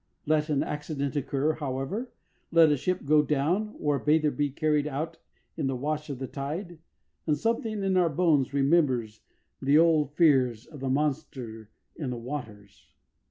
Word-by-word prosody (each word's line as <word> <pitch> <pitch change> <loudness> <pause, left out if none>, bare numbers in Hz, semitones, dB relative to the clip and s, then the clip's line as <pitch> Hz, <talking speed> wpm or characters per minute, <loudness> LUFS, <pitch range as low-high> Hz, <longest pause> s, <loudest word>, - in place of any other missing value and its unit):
Let 155 0 +1
an 145 -2 +1
accident 150 -1 -3
occur, 145 +2 0
however 150 - -3 0.4
let 165 -2 +6
a - - +4
ship 180 +4 -2
go 150 +1 +5
down 160 +9 0
or 145 -1 +1
a - - -8
bather 150 0 +3
be 145 0 0
carried 150 +1 +1
out 155 +3 -4 0.4
in 150 -4 -1
the 135 - -1
wash 150 +4 -3
of 140 - -4
the 130 - -4
tide 160 +6 -5 0.5
and 150 -1 +2
something 220 +2 -1
in 190 -1 +1
our 180 -2 +4
bones 150 -4 +2
remembers 135 -7 +1 0.4
the 140 +2 +4
old 155 -3 +3
fears 130 -8 +3
of 150 - -12
the 135 0 -2
monster 130 -6 -2 0.3
in 145 -5 -4
the 125 - -3
waters. 115 -6 -8
150 Hz, 165 wpm, -28 LUFS, 135-160 Hz, 0.5 s, let